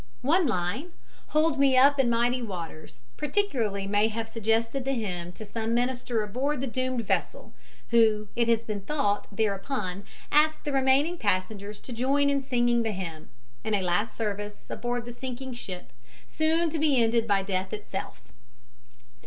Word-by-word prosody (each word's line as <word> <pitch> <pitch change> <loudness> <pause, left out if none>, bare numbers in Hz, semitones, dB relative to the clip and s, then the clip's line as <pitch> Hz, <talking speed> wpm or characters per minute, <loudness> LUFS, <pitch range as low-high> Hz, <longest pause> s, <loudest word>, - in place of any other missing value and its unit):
One 325 +5 +4
line, 220 - -2 0.3
"Hold 305 -1 +2
me 270 -2 +5
up 280 +2 +6
in 255 -3 +4
mighty 240 +2 +2
waters," 170 - -7 0.2
particularly 260 - 0
may 205 +2 +3
have 225 0 -3
suggested 225 +3 0
the 270 +1 0
hymn 180 -7 -3
to 215 - -8
some 225 +2 -2
minister 245 -2 0
aboard 260 +7 -1
the 270 - -1
doomed 255 -1 -1
vessel, - - -2 0.4
who, 220 -2 +4
it 235 -1 +2
has 230 -1 +3
been 215 -3 -4
thought, 205 -4 0
thereupon 200 -1 -2 0.3
asked 310 +1 +3
the 290 - -1
remaining 275 +6 +3
passengers 205 +1 -1
to 250 - -8
join 280 +4 +2
in 280 -1 +1
singing 240 -2 +2
the 225 -2 -1
hymn, 165 -5 -6 0.3
in 220 -1 +1
a 195 - 0
last 180 +5 0
service 205 -1 -4
aboard 240 0 -2
the 240 - -7
sinking 260 +1 -6
ship, 185 -7 -7 0.3
soon 320 +1 +1
to 320 - -2
be 290 -4 +3
ended 230 0 +2
by 200 -2 +2
death 190 -1 -2
itself. 210 -2 -6
230 Hz, 160 wpm, -27 LUFS, 205-270 Hz, 0.4 s, up